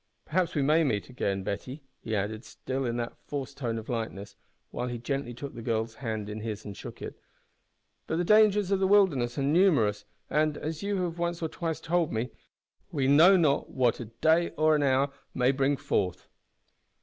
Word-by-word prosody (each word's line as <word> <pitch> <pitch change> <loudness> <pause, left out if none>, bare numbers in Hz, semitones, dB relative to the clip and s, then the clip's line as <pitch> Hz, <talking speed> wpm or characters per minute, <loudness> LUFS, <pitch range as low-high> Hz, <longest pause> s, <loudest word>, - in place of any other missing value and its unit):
Perhaps 175 +1 0
we 145 - +2
may 155 +4 +4
meet 110 -8 -1
again, 100 -6 -2
Betty," 125 +10 -5 0.2
he 110 - -3
added, 105 +3 -2
still 130 +4 -4
in 120 0 -2
the 120 0 -3 0.2
forced 140 -2 -5
tone 115 -4 -2
of 110 - -7
lightness, 110 -4 -4 0.4
while 125 - -3
he 120 -1 -4
gently 130 +2 -3
took 135 +4 -7
the 120 - -8
girl's 110 -1 -1
hand 110 -4 -3
in 105 +1 -5
his 110 -2 -5
and 100 -1 -7
shook - - -9
it; - - -7 0.9
"but 160 - -1
the 175 - +1
dangers 210 0 +4
of 195 - +3
the 190 - +2
wilderness 160 -13 +3
are 140 - 0
numerous, 140 - +3 0.2
and, 150 0 +1
as 155 0 -4
you 200 -2 -1
have 170 -1 -4
once 170 0 -1
or 160 - -1
twice 165 -1 -3
told 170 0 0
me, 115 +3 -2 0.6
we 135 -3 0
`know 170 +7 +7
not 150 -4 +2
what 125 -3 +1
a 120 - -5
day 160 +10 +2
or 155 0 +4
an 150 - +1
hour 140 0 +2 0.2
may 125 0 +3
bring 140 +1 +1
forth.'" 90 -7 -1
135 Hz, 195 wpm, -28 LUFS, 115-160 Hz, 0.9 s, `know